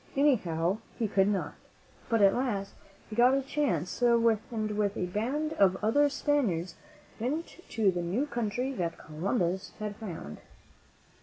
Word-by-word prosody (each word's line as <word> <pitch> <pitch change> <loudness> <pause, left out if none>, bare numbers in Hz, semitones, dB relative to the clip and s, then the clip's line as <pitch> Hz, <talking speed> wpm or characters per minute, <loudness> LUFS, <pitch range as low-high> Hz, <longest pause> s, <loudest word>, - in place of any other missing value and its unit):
Anyhow, 195 - +2 0.2
he 225 - 0
could 195 -1 +3
not. 205 -2 -1 0.6
But 225 -3 +3
at 195 0 +6
last 215 -6 -2 0.3
he 215 - -7
got 245 +3 +5
a 275 - 0
chance, 250 - -1
and 235 -1 +4 0.5
with 205 -1 0
a 180 - 0
band 255 - -1
of 190 -2 +4
other 290 +7 +4
Spaniards 220 - 0 0.5
went 300 +10 -3
to 215 -4 +2
the 175 -1 -2
new 190 +11 0
country 240 0 -2
that 170 -8 -2
Columbus 180 +3 -2
had 210 -1 -4
found. 170 - -7
215 Hz, 145 wpm, -30 LUFS, 185-255 Hz, 0.6 s, at